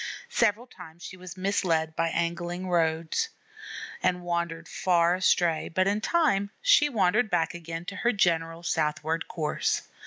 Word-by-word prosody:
Several 225 - +2
times 175 -7 -13
she - - -8
was 185 0 -10
misled 170 -5 0
by 165 0 +1
angling 175 +2 -2
roads, 165 -2 0 0.7
and 180 0 0
wandered 170 -1 -2
far 175 -2 +2
astray, 175 -3 +2
but 185 +3 +1
in 205 +2 +1
time 245 -11 +2
she - - +5
wandered 215 -1 +2
back 170 -4 +1
again 165 0 -6
to 200 +2 -6
her 240 +3 +2
general 165 -4 0
southward 160 0 -1
course. 155 -3 -1
175 Hz, 145 wpm, -27 LUFS, 165-195 Hz, 0.7 s, she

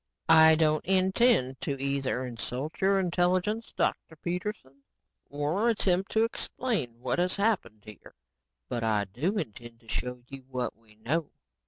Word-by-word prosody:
"I 160 0 +8
don't 155 -1 +2
intend 190 - +3
to 140 -1 -3
either 135 -2 -1
insult 125 +5 -5
your 195 +1 +4
intelligence, 185 +5 0
Dr. 160 - -1
Peterson, 170 -5 -5 0.5
or 150 +11 0
attempt 195 -4 +1
to 220 - +4
explain 215 - -2
what 125 +6 -1
has 180 +1 +1
happened 200 - 0
here. 105 -1 -13 0.5
But 120 - -3
I 105 -2 +1
do 150 - -2
intend 120 - -6
to 115 - -23
show 125 +1 -4
you 135 0 -10
what 125 -3 -3
we 110 -1 -23
know." 145 +9 -2
155 Hz, 145 wpm, -29 LUFS, 125-190 Hz, 0.5 s, I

